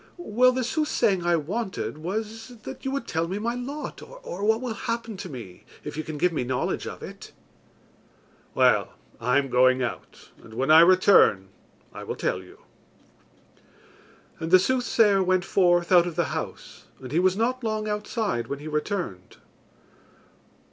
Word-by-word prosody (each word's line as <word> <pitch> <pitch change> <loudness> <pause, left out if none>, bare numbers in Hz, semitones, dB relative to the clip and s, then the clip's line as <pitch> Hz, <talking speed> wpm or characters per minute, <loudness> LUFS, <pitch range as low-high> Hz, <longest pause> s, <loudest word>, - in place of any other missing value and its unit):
"Well, 255 -6 +3
the 255 0 -1
soothsaying 245 - +1
I 175 - +4
wanted 185 0 -3
was 220 +7 -5
that - - -8
you 270 - -2
would 275 -2 -3
tell 165 +1 -1
me 190 +3 -3
my 230 +3 -2
lot 270 +5 -6
or - - -8
what 220 +1 +3
will 250 -2 -4
happen 230 -1 -4
to 185 -1 -7
me, 115 - -10 0.2
if - - -6
you 155 - -3
can 155 -1 -6
give 175 +3 +1
me 150 - -1
knowledge 125 0 -2
of - - -8
it." - - -10 1.2
"Well, - - +3 0.2
I 125 +3 +2
am 135 -2 0
going 130 +1 +4
out, 120 - -7
and 110 - -14
when 135 +5 +1
I 160 - +9
return, 170 - +5 0.4
I - - -8
will - - -4
tell 90 - -2
you." 90 - -17 1.8
And 160 - -4
the 185 - +8
soothsayer 225 -2 +2
went 185 0 +1
forth 175 -3 +2
out 175 -1 +6
of 170 - -5
the - - +2
house - - -7
and 130 -1 -9
he 160 - +2
was 185 +1 +2
not 250 +3 0
long 215 -1 -2
outside 210 - -2
when 140 - -4
he 150 +2 -9
returned. 150 - -4
185 Hz, 170 wpm, -25 LUFS, 150-225 Hz, 1.8 s, I